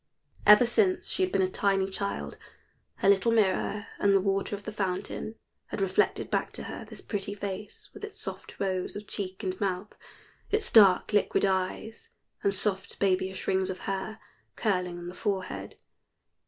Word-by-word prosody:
Ever 210 +4 +9
since 370 - +2
she - - -2
had 370 0 +2
been 190 - +2
a - - +3
tiny 195 -1 +2
child, 200 +1 -4 0.6
her - - 0
little 200 +3 +5
mirror 210 -1 +1
and 200 -1 +4
the - - +6
water 195 +1 0
of 200 - -10
the 215 - -5
fountain 195 +2 -3 0.3
had - - -5
reflected 190 -1 +1
back - - 0
to - - -5
her - - -6
this - - -11
pretty 205 -1 -3
face, 200 0 -6
with 410 - -12
its 420 0 -7
soft - - -6
rose 185 -2 -1
of 205 +1 -6
cheek 190 0 -4
and 185 0 -3
mouth, 195 +1 -2 0.5
its 430 +1 +1
dark 200 -2 +6
liquid 205 -1 +3
eyes, 195 - -2 0.3
and 200 - +2
soft 195 -1 -1
babyish 190 -1 0
rings 190 0 +2
of 185 - -5
hair 195 +2 -3 0.4
curling 180 -5 0
on 175 0 -7
the 175 - -6
forehead. 190 -2 -3
195 Hz, 170 wpm, -29 LUFS, 190-210 Hz, 0.6 s, Ever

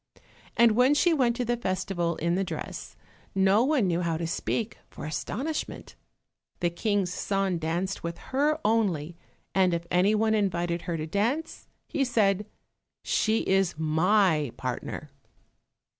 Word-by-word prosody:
And 235 -1 +6
when 250 +6 +4
she 340 +3 +4
went 250 -6 +2
to 245 0 -2
the 240 +1 +1
festival 185 -5 -1
in 170 +2 0
the 190 +2 +1
dress, - - -6 0.4
no 195 +3 +4
one 275 -5 +2
knew 175 -1 +1
how 165 -2 0
to 170 - -3
speak 215 +6 -2
for - - -8
astonishment. 205 - -4 0.7
The 175 -1 +1
King's 195 0 0
son 195 -3 -1
danced 175 +4 -2
with 170 0 -4 0.2
her 300 +3 +2
only, 180 -8 +1 0.4
and 185 -2 +3
if 170 0 -4
any 185 +4 +4
one 220 +1 +2
invited 175 -5 0
her 170 - -1
to 155 - -3
dance, 235 - -2 0.2
he 280 - 0
said, 210 -5 +1 0.6
"She 220 0 +1
is 190 -4 +2
my 160 - +2
partner." 130 +3 -5
195 Hz, 145 wpm, -27 LUFS, 170-225 Hz, 0.7 s, And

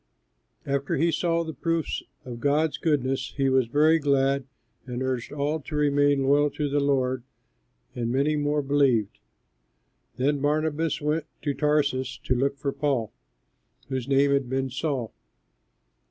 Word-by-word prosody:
After 140 0 -1
he 165 +4 +2
saw 170 +1 +1
the 160 -1 -6
proofs 165 +3 -1 0.2
of 120 -2 -7
God's 145 +4 +1
goodness, 135 -4 0
he 135 -1 +2
was 130 -2 +3
very 155 +6 +4
glad 140 -2 +1 0.4
and 125 +1 -3
urged 130 -2 -2
all 150 +2 -1
to 150 +1 -7
remain 145 -1 +3
loyal 145 +2 +3
to 145 +1 -2
the 145 +1 +1
Lord; 130 -3 +1 0.7
and 120 -1 -2
many 140 +4 +1
more 145 0 0
believed. 135 -7 +2 1.0
Then 140 +3 +1
Barnabas 155 +2 0
went 150 +2 0 0.2
to 145 - 0
Tarsus 140 -4 0
to - - +1
look 140 +3 0
for 140 0 -2
Paul, 135 -7 -1 0.8
whose 130 -2 -3
name 140 +1 +3
had 140 -3 +1
been 130 0 -1
Saul. 130 -4 -2
140 Hz, 145 wpm, -26 LUFS, 130-150 Hz, 1.0 s, very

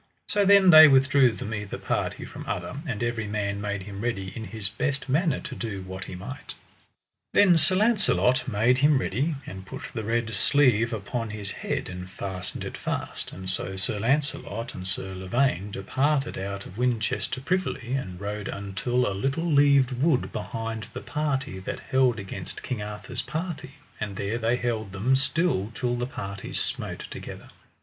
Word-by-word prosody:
So 205 -1 +3
then 195 -2 +7
they 155 -1 +12
withdrew 135 -2 +5
them 110 - -5
either 105 -2 -4
party - - -2
from - - -8
other, - - -3
and 120 -5 -2
every 115 -2 -1
man 100 -1 -2
made 100 -1 -2
him 100 0 -7
ready 100 -5 -2
in 110 - -5
his 105 +1 -3
best 140 +6 -2
manner 150 +2 +2
to - - -6
do 100 -5 -4
what 95 +1 -6
he 95 - -7
might. 120 +10 -8 0.8
Then 200 -4 +7
Sir 165 +3 +3
Launcelot 205 - +3
made 120 +3 +3
him 145 +1 +5
ready, 140 +5 0
and 95 0 -7
put 95 - -8
the 110 - -3
red 115 +1 0
sleeve 120 -1 +4
upon 115 +2 -3
his 105 -1 -4
head, - - -3
and 90 0 -7
fastened 95 -1 -5
it - - -6
fast; - - -4
and 95 0 -8
so 95 0 -1
Sir 95 +2 -1
Launcelot 130 -2 -1
and 95 0 -6
Sir 95 0 -2
Lavaine 95 +1 0
departed 135 +9 0
out 100 +1 -4
of 95 - -10
Winchester 125 0 0
privily, 135 -5 -1
and 95 -10 -3
rode 105 0 -4
until 100 +6 -1
a 100 - -1
little 135 - -1
leaved 140 -4 +5
wood 130 +2 +1
behind 115 -1 -4
the - - -4
party 140 -9 -2
that 95 - -5
held 130 -3 +4
against 100 -2 -6
King 120 -5 -3
Arthur's 105 +4 -4
party, 155 -4 -5 0.2
and 105 -2 -3
there 105 +4 -1
they 115 +1 +2
held 110 -5 -2
them 115 +7 +2
still 140 - +1
till 120 +1 0
the 120 0 -2
parties 100 -6 -4
smote - - -3
together. - - -8
115 Hz, 175 wpm, -26 LUFS, 100-135 Hz, 0.8 s, they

